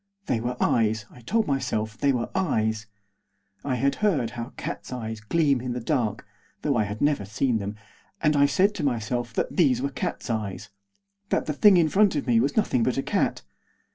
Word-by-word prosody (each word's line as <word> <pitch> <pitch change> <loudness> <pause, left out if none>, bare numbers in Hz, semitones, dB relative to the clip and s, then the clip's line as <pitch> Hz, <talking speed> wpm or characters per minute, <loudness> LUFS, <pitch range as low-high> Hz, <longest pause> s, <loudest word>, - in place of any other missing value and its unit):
They 120 - 0
were 125 +1 -3
eyes, 110 -2 +1
I 125 - -15
told 220 - +1
myself 110 - -1
they 140 +5 +2
were 120 -3 -2
eyes. 110 - 0 0.8
I 135 -3 -1
had 140 +3 +1
heard 155 - +1
how 120 0 -6
cats' - - -6
eyes 110 -3 -5
gleam 140 +2 +2
in 125 -1 -3
the 125 - -3
dark, 115 -5 -1 0.4
though 145 -3 +1
I 110 -3 +2
had 105 +1 -6
never 145 -7 +2
seen 110 +4 0
them, 100 +1 -4 0.4
and 150 -1 +2
I 140 0 +5
said 195 +7 +3
to 175 - -4
myself 120 -2 -1
that - - -2
these 135 -9 +4
were 140 +2 -2
cats' - - -4
eyes; 105 -4 -4 0.6
that - - +1
the 150 - -2
thing 195 +5 +6
in 165 -2 +4
front 195 +3 +3
of 145 - -1
me 120 -3 +3
was 140 - 0
nothing 205 - +2
but 130 +3 +1
a 135 - 0
cat. - - 0
125 Hz, 200 wpm, -25 LUFS, 110-145 Hz, 0.8 s, thing